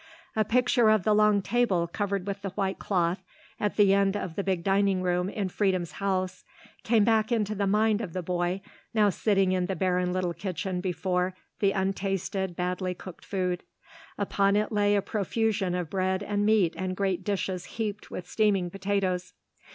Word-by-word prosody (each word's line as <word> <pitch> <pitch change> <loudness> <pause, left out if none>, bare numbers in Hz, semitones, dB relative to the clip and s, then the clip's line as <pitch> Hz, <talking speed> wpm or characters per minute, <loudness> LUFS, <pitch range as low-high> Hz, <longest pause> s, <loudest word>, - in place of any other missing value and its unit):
A 215 - +3
picture 240 +1 +3
of 215 -3 +4
the 215 - +3
long 210 -1 +4
table 215 -8 +2
covered 200 +2 -2
with 200 0 -4
the 200 - -3
white 190 0 -2
cloth 180 -1 0 0.4
at 210 - -1
the 200 -2 +5
end 200 0 +2
of 180 -5 -5
the 200 - -1
big 185 -3 -1
dining 195 -1 +2
room 180 +1 +1
in 205 -2 -2
Freedom's 185 -3 0
house 185 -2 -2 0.4
came 225 -2 +4
back 220 +1 +2
into 215 -3 +1
the 200 -1 -1
mind 210 +2 +2
of 190 -7 -5
the 185 - -3
boy 180 +2 -1 0.3
now 210 -2 +4
sitting 195 -1 +2
in 180 -1 +1
the 190 - -2
barren 180 0 +1
little 180 -1 -1
kitchen 185 0 -3
before 180 0 -1 0.2
the 200 -1 +3
untasted, 195 -1 -2
badly 180 +1 -2
cooked 180 0 -11
food. 180 -2 -2 0.6
Upon 200 0 +2
it 210 +1 +1
lay 205 -1 +3
a 200 - +1
profusion 210 -2 0
of 175 -3 -3
bread 190 0 0
and 205 0 0
meat 205 -6 +3
and 185 -1 -3
great 190 -2 0
dishes 190 -2 -2
heaped 210 -2 -3
with 180 - -6
steaming 200 -5 +1
potatoes. 190 -2 -1
195 Hz, 180 wpm, -28 LUFS, 185-205 Hz, 0.6 s, the